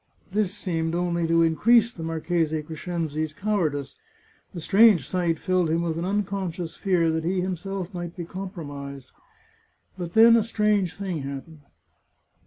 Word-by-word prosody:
This 205 -2 +1
seemed 165 -4 -2
only 170 -1 0
to 165 0 +4
increase 225 +8 +4
the 165 - -9
Marchese 160 -1 -1
Crescenzi's 155 -1 -3
cowardice 155 -10 -1 0.3
— - - -35
the 175 - -7
strange 195 - +5
sight 175 -3 0
filled 185 -1 +1
him 165 +2 +1
with 165 -2 -1
an 170 - -2
unconscious 190 -4 -2
fear 175 -4 +1
that 160 0 -1
he 180 +2 0
himself 190 +1 -4
might 175 -1 -6
be 175 - -5
compromised. 145 -8 -7 0.9
But 175 -1 -5
then 230 +1 +8
a 230 - +5
strange 210 -4 +1
thing 190 -5 -3
happened. 140 +3 -7
175 Hz, 150 wpm, -25 LUFS, 160-195 Hz, 0.9 s, then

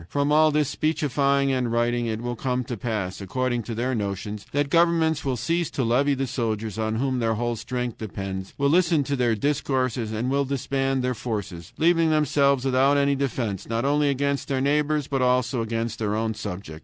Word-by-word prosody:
From 145 0 0
all 155 +1 +5
this 150 -1 +1
speechifying 140 -3 +1
and 125 -3 0
writing 120 0 +1
it 110 0 -3
will 120 0 -3
come 125 +1 -1
to 120 0 -5
pass, 105 -4 -3
according 120 +5 -1
to 115 +1 -6
their 125 +3 -1
notions, 100 -1 -4
that 145 0 0
governments 165 -2 +3
will 130 -2 -1
cease 170 +6 0
to 140 - -2
levy 135 +5 +2
the 135 0 -1
soldiers, 110 -4 -3
on 110 0 -1
whom 130 +2 0
their 115 -1 +1
whole 120 +1 -1
strength 125 +1 -4
depends, 95 -2 -5
will 140 0 +2
listen 165 -3 +3
to 140 +1 -1
their 120 -3 +1
discourses, 130 -2 -1
and 115 +4 -2
will 140 +1 +2
disband 135 -1 -1
their 125 0 0
forces, 100 -8 -5
leaving 165 0 +3
themselves 140 -3 +2
without 135 +2 +3
any 140 0 +3
defense, 125 -8 -2
not 115 +2 -1
only 145 +1 +2
against 140 0 -1
their 135 -2 0
neighbors, 150 +1 +1
but 135 -1 -1
also 125 -1 +2
against 115 0 -3
their 105 -2 -1
own 110 0 -1
subjects. 90 -6 -7
130 Hz, 195 wpm, -24 LUFS, 115-140 Hz, -, all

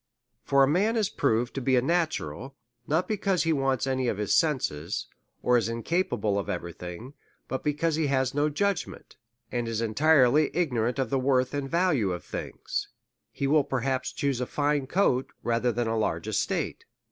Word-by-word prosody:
For 140 -1 +4
a - - +4
man 200 - +2
is 210 -3 +1
proved 120 -7 0
to 135 - -3
be 130 +1 +2
a 125 - +4
natural, 155 -4 -1 0.3
not 160 +5 +1
be 215 - -1
cause 190 -3 +1
he 165 -1 +2
wants 135 -4 +1
any 130 -1 0
of 110 - 0
his 105 -1 0
senses, 105 - 0 0.4
or 125 0 +4
is 115 -1 -2
incapable 115 - 0
of 100 - -5
every 85 -3 -4
thing, 90 - -8 0.3
but 130 - -4
because 150 +2 0
he 160 -2 +1
has 130 -2 +1
no 145 +2 +2
judgment, 195 +5 -2 0.3
and 120 -1 -2
is 115 -1 -2
entirely 140 +4 +4
ignorant 125 -7 0
of 135 -4 -1
the 135 - +2
worth 130 0 +1
and 140 -1 -3
value 155 - +2
of 90 - -6
things - - -4 0.2
— - - -58
he 140 - -3
will 145 +1 +4
perhaps 135 -1 -1
chuse 140 -3 -1
a 125 - -2
fine 145 -2 0
coat 135 -6 +1
rather 120 +1 +1
than 120 +1 -1
a 115 0 -1
large 110 - -1
es - - +1
tate. - - -3
135 Hz, 195 wpm, -27 LUFS, 120-150 Hz, 0.4 s, For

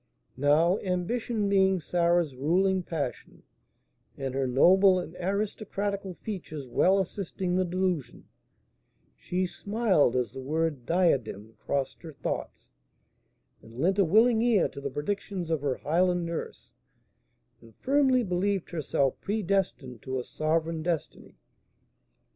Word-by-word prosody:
Now, 155 +8 +3
ambition 205 +4 -1
being 190 -1 +3
Sarah's 170 -3 +1
ruling 185 +8 +2
passion, 155 -7 -5 0.7
and 135 -1 -4
her 135 0 0
noble 185 +9 +5
and 175 -2 -5
aristocratical 200 0 -3
features 160 -10 -7
well 185 +10 +3
assisting 185 -1 -3
the 185 0 +2
delusion, 180 -5 -2 0.9
she 185 +1 -2
smiled 195 - +1
as 125 -4 0
the 130 +2 -8
word 150 -2 -2
"diadem" 130 - 0
crossed 140 -1 -3
her 160 -2 -9
thoughts, - - -5 0.9
and 115 +1 -15
lent 190 +6 +2
a - - +6
willing 220 +6 +4
ear 230 -6 +3
to 140 - -9
the 140 - -3
predictions 180 +3 -4
of 160 -3 0
her 140 -3 0
Highland 175 +2 +1
nurse, 170 -1 -6 0.9
and 115 -2 -18
firmly 265 -2 +2
believed 195 0 -1
herself 140 -5 -1
predestined 195 - -1
to 130 +2 -3
a - - -4
sovereign 160 +2 -1
destiny. 165 -3 -4
175 Hz, 125 wpm, -28 LUFS, 145-195 Hz, 0.9 s, a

